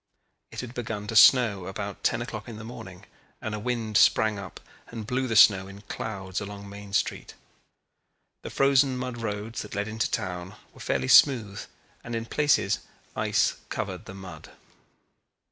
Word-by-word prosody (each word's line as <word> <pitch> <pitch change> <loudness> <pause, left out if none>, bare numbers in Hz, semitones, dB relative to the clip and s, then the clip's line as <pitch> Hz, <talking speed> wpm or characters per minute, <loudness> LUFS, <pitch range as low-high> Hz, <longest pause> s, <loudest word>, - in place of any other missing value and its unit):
It - - -6
had 125 -1 -8
begun 110 -4 -4
to 110 - -5
snow 110 -5 +6
about 100 +1 -6
ten 120 - +1
o'clock 110 -2 -7
in 110 - -8
the 110 - -8
morning 95 -6 -10 0.3
and 110 - -5
a 105 - -3
wind 110 -2 -1
sprang 110 -2 +4
up 100 -2 -9 0.3
and 115 -2 -7
blew 130 +3 -1
the 115 - -2
snow 95 -2 +6
in 100 +1 -11
clouds 95 -2 -5
along 100 0 -8
Main 100 0 -10
Street. - - -1 1.1
The - - -7
frozen 135 -1 +3
mud 125 -1 -4
roads 110 0 -4
that - - -8
led 100 +1 -1
into 110 0 -1
town 90 +1 -4 0.2
were - - -17
fairly 65 -1 -1
smooth 110 - +5 0.4
and 115 - -5
in 115 0 -3
places 145 +4 +2 0.4
ice - - +1
covered - - -4
the 95 - -9
mud. 95 -2 -10
105 Hz, 165 wpm, -27 LUFS, 100-120 Hz, 1.1 s, snow